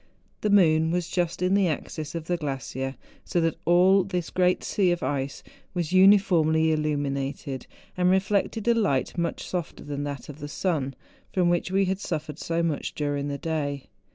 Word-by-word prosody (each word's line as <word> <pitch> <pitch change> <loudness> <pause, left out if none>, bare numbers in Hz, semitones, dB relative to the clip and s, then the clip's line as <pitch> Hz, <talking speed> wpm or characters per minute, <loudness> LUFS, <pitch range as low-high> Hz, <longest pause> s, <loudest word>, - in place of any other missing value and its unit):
The 210 - +1
moon 160 -5 +4
was 175 0 -1
just 175 -1 -1
in 180 +1 +2
the 200 -2 +4
axis 155 0 -4
of 165 -1 -4
the 175 - 0
glacier, 135 -3 -4 0.3
so 175 - -1
that 165 0 +1
all 185 +3 +5
this 180 -3 -3
great 180 0 +2
sea 195 -3 +1
of 175 0 0
ice 135 -1 -2 0.3
was 175 -1 -2
uniformly 175 -5 +5
illuminated, 140 -3 -2 0.3
and 180 0 +2
reflected 200 +3 +1
a 235 - +6
light 145 - 0
much 170 -1 -2
softer 175 -4 -4
than 145 -1 -4
that 140 -2 -6
of 145 0 -10
the 145 - -6
sun, 145 -4 -1 0.4
from 180 -2 +2
which 175 +1 0
we 195 +1 +2
had 190 +1 -1
suffered 155 -5 -4
so 165 0 -1
much 160 -4 -2
during 145 -1 -1
the 140 -1 -3
day. 145 -3 -3
165 Hz, 180 wpm, -26 LUFS, 145-185 Hz, 0.4 s, a